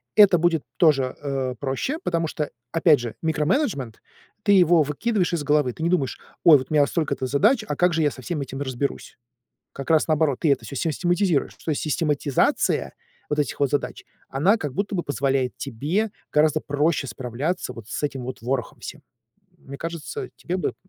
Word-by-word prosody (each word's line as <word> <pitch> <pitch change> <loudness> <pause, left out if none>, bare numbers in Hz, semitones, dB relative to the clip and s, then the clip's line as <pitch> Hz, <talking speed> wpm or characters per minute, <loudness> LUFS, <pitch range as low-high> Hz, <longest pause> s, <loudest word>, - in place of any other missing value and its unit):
Это 205 -4 +7
будет 165 -2 +1
тоже, 135 -6 +3
э, 135 -3 -2
проще, 140 - -2
потому 165 -1 0
что, 150 -1 -4 0.2
опять 165 -2 +4
же, 120 -2 -5
микроменеджмент- 155 - 0 0.4
ты 205 - +3
его 175 -4 +5
выкидываешь 180 +6 -1
из 165 -3 -1
головы. 145 -4 +2
Ты - - -11
не 170 - +2
думаешь: 150 -8 0 0.2
"Ой, 160 -4 +9
вот 130 - -7
у - - -1
меня 145 -2 +5
столько-то 145 -5 -1
задач, 205 - +3
а 150 - -2
как 180 +3 +2
же 160 0 +1
я 145 - +2
со 130 - -10
всем 150 +4 -3
этим 135 0 -6
разберусь?" 135 0 -4 0.6
Как 135 +1 -7
раз 160 0 +4
наоборот, 155 -4 +1
ты 155 - +3
это - - -1
всё 140 - -7
систематизируешь. 175 +2 0
То - - -5
есть 150 - -1
систематизация 150 -3 +1 0.4
вот 150 - -1
этих 145 -4 -1
вот 140 -2 +2
задач, 145 - -2 0.2
она 165 +11 +3
как 145 -8 -4
будто 200 +4 -2
бы 175 - 0
позволяет 135 -3 -1
тебе 150 - -2 0.2
гораздо 155 +1 +3
проще 145 0 0
справляться 130 +7 -3
вот 115 -3 -11
с - - -4
этим 135 -3 -2
вот 130 -1 -7
ворохом 125 0 -3
всем. - - -8 0.6
Мне 140 - -10
кажется, 170 - -5
тебе 180 - -3
бы - - 0
м - - -6
150 Hz, 190 wpm, -24 LUFS, 135-170 Hz, 0.6 s, Ой